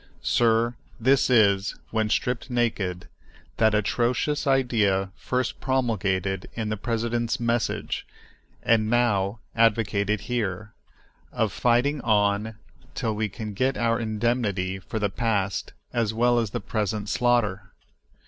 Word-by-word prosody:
Sir, 115 Hz, 0 st, +2 dB, 0.3 s
this 135 Hz, +4 st, +3 dB
is, 100 Hz, -4 st, +3 dB, 0.2 s
when 110 Hz, -1 st, 0 dB
stripped 125 Hz, +4 st, -1 dB
naked, 105 Hz, -7 st, -1 dB, 0.5 s
that 110 Hz, -1 st, +3 dB
atrocious 125 Hz, +7 st, 0 dB
idea 110 Hz, -8 st, +2 dB
first 125 Hz, 0 st, -2 dB
promulgated 100 Hz, -7 st, -1 dB
in 110 Hz, -2 st, -2 dB
the 110 Hz, -, -1 dB
president's 115 Hz, +1 st, -1 dB
message, 115 Hz, 0 st, -1 dB, 0.6 s
and 110 Hz, -2 st, +3 dB
now 110 Hz, -3 st, +1 dB
advocated 105 Hz, -2 st, +2 dB
here, 110 Hz, -3 st, -3 dB, 0.6 s
of -, -, 0 dB
fighting 125 Hz, +5 st, +2 dB
on 105 Hz, 0 st, +1 dB, 0.4 s
till 110 Hz, -, -1 dB
we 105 Hz, 0 st, -1 dB
can 105 Hz, +1 st, -6 dB
get 130 Hz, +7 st, 0 dB
our 115 Hz, -1 st, +1 dB
indemnity 110 Hz, -4 st, -1 dB
for 95 Hz, -, -6 dB
the 105 Hz, -2 st, 0 dB
past 100 Hz, -4 st, -1 dB, 0.2 s
as 115 Hz, -3 st, 0 dB
well 120 Hz, +1 st, +3 dB
as 115 Hz, -3 st, -1 dB
the -, -, -3 dB
present 105 Hz, 0 st, -2 dB
slaughter. 105 Hz, -5 st, +1 dB
110 Hz, 120 wpm, -25 LUFS, 100-120 Hz, 0.6 s, this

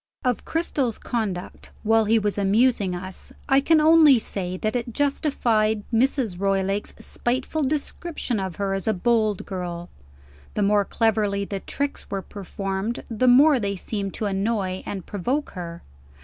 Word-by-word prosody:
Of 250 Hz, -2 st, 0 dB
Cristel's 285 Hz, -8 st, -1 dB
conduct, 200 Hz, -7 st, -4 dB
while 225 Hz, 0 st, +3 dB
he 225 Hz, +2 st, +4 dB
was 205 Hz, -2 st, 0 dB
amusing 200 Hz, -1 st, +2 dB
us, 185 Hz, +1 st, -7 dB, 0.2 s
I 270 Hz, 0 st, +4 dB
can 320 Hz, +3 st, +4 dB
only 310 Hz, -3 st, +7 dB
say 185 Hz, -4 st, -3 dB
that 215 Hz, +5 st, -2 dB
it 240 Hz, -1 st, -2 dB
justified 230 Hz, -7 st, +1 dB
Mrs. 235 Hz, -5 st, +1 dB
Roylake's 195 Hz, +1 st, 0 dB
spiteful 260 Hz, +6 st, -2 dB
description 295 Hz, -3 st, -2 dB
of 190 Hz, -3 st, -4 dB
her 200 Hz, -1 st, -1 dB
as 195 Hz, +1 st, -3 dB
a 220 Hz, -, +3 dB
bold 215 Hz, 0 st, +1 dB
girl. 175 Hz, -2 st, -5 dB, 0.6 s
The 210 Hz, -, +1 dB
more 205 Hz, 0 st, +3 dB
cleverly 210 Hz, -3 st, +1 dB
the 195 Hz, 0 st, -4 dB
tricks 280 Hz, +8 st, -4 dB
were 195 Hz, -1 st, -3 dB
performed, 195 Hz, +2 st, -4 dB
the 230 Hz, +3 st, +1 dB
more 270 Hz, +3 st, +6 dB
they 200 Hz, -2 st, -1 dB
seemed 195 Hz, 0 st, -4 dB
to 215 Hz, -, -3 dB
annoy 195 Hz, -1 st, -1 dB
and 190 Hz, -4 st, -5 dB
provoke 250 Hz, +10 st, -2 dB
her. 170 Hz, -2 st, -7 dB
215 Hz, 150 wpm, -24 LUFS, 195-250 Hz, 0.6 s, only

